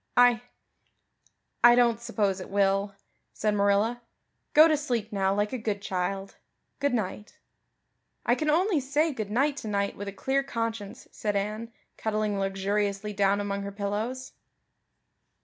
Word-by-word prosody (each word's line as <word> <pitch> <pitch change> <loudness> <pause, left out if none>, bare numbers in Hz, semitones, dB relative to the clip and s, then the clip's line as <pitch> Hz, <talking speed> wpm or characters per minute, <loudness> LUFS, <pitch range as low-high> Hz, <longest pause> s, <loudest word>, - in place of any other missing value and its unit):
"I 245 -2 +6 1.2
I 240 0 +9
don't 235 -2 +3
suppose 210 -5 0
it 185 - -8
will," 195 0 +1 0.4
said 215 -1 0
Marilla. 205 +4 +2 0.5
"Go 310 +2 +9
to 310 - +3
sleep 240 -7 -2
now 195 -1 +1
like 205 +3 0
a 255 - -2
good 210 -2 -2
child. 195 0 -3 0.4
Good 285 -3 +1
night." 210 -1 -4 0.9
"I 240 - +4
can 305 +4 0
only 350 +2 +3
say 290 +4 +1
good 215 -5 -4
night 275 +6 +1
tonight 200 -4 -2
with 205 - -7
a - - -3
clear 265 +7 0
conscience," 230 -6 -4
said 210 -1 -2
Anne, 215 +3 -2 0.3
cuddling 215 -2 -1
luxuriously 200 +1 -1
down 200 0 +2
among 200 -1 -2
her 200 0 -5
pillows. 210 +6 -3
210 Hz, 145 wpm, -27 LUFS, 200-245 Hz, 1.2 s, I